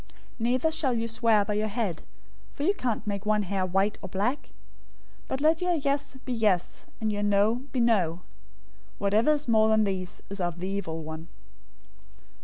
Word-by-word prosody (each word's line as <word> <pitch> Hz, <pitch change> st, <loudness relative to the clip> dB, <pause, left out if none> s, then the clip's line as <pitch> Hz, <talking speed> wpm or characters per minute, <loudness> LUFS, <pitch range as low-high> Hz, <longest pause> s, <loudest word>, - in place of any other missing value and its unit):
005:036 -, -, -25 dB, 0.3 s
Neither 250 Hz, +7 st, +2 dB
shall 310 Hz, -5 st, 0 dB
you 230 Hz, 0 st, -1 dB
swear 225 Hz, -2 st, +2 dB
by 210 Hz, -, -1 dB
your 210 Hz, +1 st, 0 dB
head, 210 Hz, -6 st, -2 dB, 0.5 s
for 285 Hz, -, -5 dB
you 380 Hz, +6 st, +3 dB
can't 240 Hz, -, -2 dB
make 200 Hz, -1 st, -3 dB
one 210 Hz, 0 st, +2 dB
hair 190 Hz, -1 st, -1 dB
white 195 Hz, +3 st, +1 dB
or -, -, -7 dB
black. 210 Hz, +10 st, -1 dB, 0.8 s
005:037 -, -, -29 dB
But 265 Hz, -, -3 dB
let 315 Hz, +2 st, +3 dB
your 360 Hz, -1 st, +2 dB
'Yes' 280 Hz, -2 st, -1 dB
be 255 Hz, -, -2 dB
'Yes' 210 Hz, -6 st, 0 dB
and 215 Hz, -1 st, 0 dB
your 205 Hz, -, -2 dB
'No' 205 Hz, +3 st, +3 dB
be 260 Hz, -, -1 dB
'No.' 185 Hz, -8 st, +2 dB, 0.8 s
Whatever 215 Hz, +9 st, +3 dB
is 295 Hz, -1 st, -3 dB
more 220 Hz, -1 st, +4 dB
than 220 Hz, 0 st, +4 dB
these 190 Hz, -3 st, -3 dB
is 200 Hz, -1 st, -4 dB
of 175 Hz, -1 st, -2 dB
the 185 Hz, -, -3 dB
evil 180 Hz, -5 st, -3 dB
one. 160 Hz, +1 st, -7 dB
215 Hz, 190 wpm, -27 LUFS, 195-245 Hz, 0.8 s, more